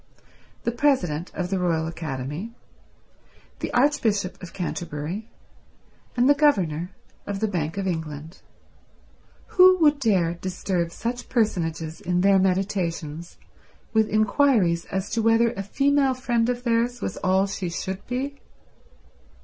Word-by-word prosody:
The 235 - 0
President 190 - +1
of 180 0 -3
the 190 - +1
Royal 165 -3 +1
Academy, 160 - -5 1.0
the - - -3
Archbishop 230 -8 +1
of 180 - -8
Canterbury, 175 +3 -4 0.9
and 245 +1 +4
the 285 - +7
Governor 185 - +2 0.4
of 200 -1 -3
the 220 - +1
Bank 170 -3 -2
of 195 - -2
England—who 165 - -1
would 300 -4 +4
dare 190 -9 +2
disturb 180 -1 -2
such 245 +6 -4
personages 165 -8 -1
in 180 -2 0
their 195 0 +5
meditations 180 -4 -1 0.6
with 220 -1 +3
inquiries 215 -5 +3
as 190 +1 -3
to 230 - 0
whether 225 +1 +4
a 225 - -5
female 275 +5 +2
friend 240 -2 0
of 245 0 -2
theirs 240 0 +1
was 185 - -4
all 190 +1 +2
she 195 -2 -4
should 190 +3 -4
be? 275 +3 -3
195 Hz, 125 wpm, -24 LUFS, 170-240 Hz, 1.0 s, the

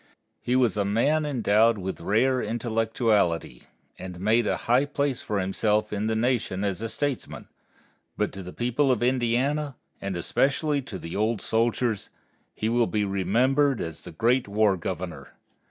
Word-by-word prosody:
He 125 - 0
was 120 -6 +2
a 100 - +2
man 140 +10 +1
endowed 115 -4 +3
with 95 -1 -5
rare 125 +5 +2
intellectuality, 110 - 0 0.3
and 90 -1 -7
made 110 +4 +2
a - - +1
high 125 +4 +4
place 140 -3 -1
for 105 -2 -2
himself 105 +3 0
in 105 +1 -1
the 110 - 0
Nation 110 -5 0
as 100 0 -2
a 115 - -3
statesman, 145 -1 -3 0.7
but 105 - 0
to 95 - -8
the 90 0 -8
people 125 +5 +1
of 120 -2 +1
Indiana, 130 +4 +1 0.3
and 100 -2 -3
especially 140 - +1
to 110 -7 -7
the 85 -2 -7
old 110 +1 0
soldiers, 115 0 0 0.5
he 110 - -2
will 120 0 +2
be 105 -1 0
remembered 125 +8 +2
as 80 -1 -5
the - - -10
Great 120 +9 +1
War 105 -1 +2
Governor. 85 -5 -6
110 Hz, 160 wpm, -26 LUFS, 100-125 Hz, 0.7 s, high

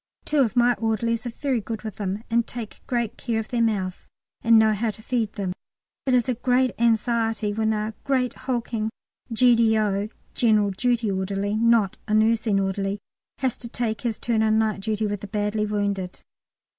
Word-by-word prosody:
Two 300 - +1
of 245 -3 +2
my 245 0 +5
orderlies 230 +1 0
are - - -2
very 255 0 -1
good 220 +1 -5
with 215 -3 -6
them, 200 +1 -3
and 235 0 +1
take 235 -3 -7
great 235 -3 -1
care 230 -3 -1
of 220 - -5
their 240 -1 0
mouths, 195 -5 -1 0.3
and 230 0 +6
know 220 0 +5
how 220 +2 0
to 215 +1 -7
feed 230 -4 -1
them. 190 -3 -3 0.5
It 260 - +4
is 245 -2 +2
a 255 - +2
great 250 +1 +2
anxiety 225 -2 +1
when 220 +1 +1
a 215 0 -2
great 260 -3 +1
hulking 235 -3 -2 0.4
G.D.O. 220 -4 +3 0.2
(General 215 -4 +3
Duty 235 +1 0
Orderly, 195 +1 -1
not 225 -3 +3
a 215 - +1
Nursing 220 -1 +3
Orderly) 195 +1 -1 0.4
has 260 -2 -1
to 240 - -8
take 230 -2 -2
his 230 -3 -2
turn 230 -2 0
on 220 0 +3
night 220 -2 +1
duty 215 +2 -1
with 205 -1 -2
the 205 - -6
badly 210 +1 -1
wounded. 200 -3 -2
220 Hz, 180 wpm, -24 LUFS, 210-235 Hz, 0.5 s, and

